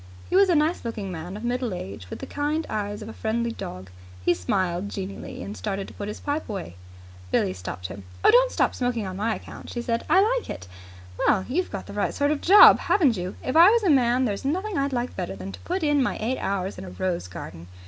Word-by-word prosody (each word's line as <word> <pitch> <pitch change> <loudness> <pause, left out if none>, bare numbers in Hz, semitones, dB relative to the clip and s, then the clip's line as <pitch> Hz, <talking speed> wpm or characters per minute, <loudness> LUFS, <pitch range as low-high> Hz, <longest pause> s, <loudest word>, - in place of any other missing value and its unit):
He - - +1
was 390 0 +6
a 350 - +4
nice 310 +3 +1
looking 220 -5 -4
man 175 +3 -6
of 215 - -9
middle 245 -4 -1
age, 95 - -8
with - - -6
the - - -7
kind 300 +2 -1
eyes 205 0 -3
of - - -9
a 225 - -7
friendly 230 +1 -1
dog. 95 - -7 0.3
He - - +5
smiled 175 - -1
genially, 195 -1 -6
and 205 - -6
started 195 -2 -3
to - - -12
put 205 - -6
his 210 - -6
pipe 290 -1 -3
away. 190 - -5 0.5
Billie 90 - +1
stopped 90 0 -7
him. 95 +2 -6 0.2
"Don't - - +6
stop - - +1
smoking 245 -4 -1
on 185 -1 -5
my 220 +2 0
account," - - -10
she 240 - -4
said. 235 -1 -1
"I 355 +5 +6 0.2
like - - -13
it. 90 - -6 0.5
Well, 190 -2 +3
you've 355 +9 -1
got - - -6
the - - -9
right - - -1
sort 285 +1 +2
of 300 - 0
a - - -17
job, 400 +4 +9
haven't 290 - +3
you! 180 0 -4
If 255 - -2
I 340 +4 +9
was 460 +1 +3
a 370 - +4
man, 255 -1 +3
there's 205 -4 -2
nothing 370 +9 -1
I'd 275 -1 0
like 245 -1 -2
better 95 - -4
than 95 0 -7
to - - -10
put 365 0 -3
in 295 -2 +3
my 250 - 0
eight 245 +4 -1
hours 195 -1 -2
in - - -7
a 185 - -8
rose 180 - -2
garden." 85 -1 -9
225 Hz, 245 wpm, -25 LUFS, 185-290 Hz, 0.5 s, job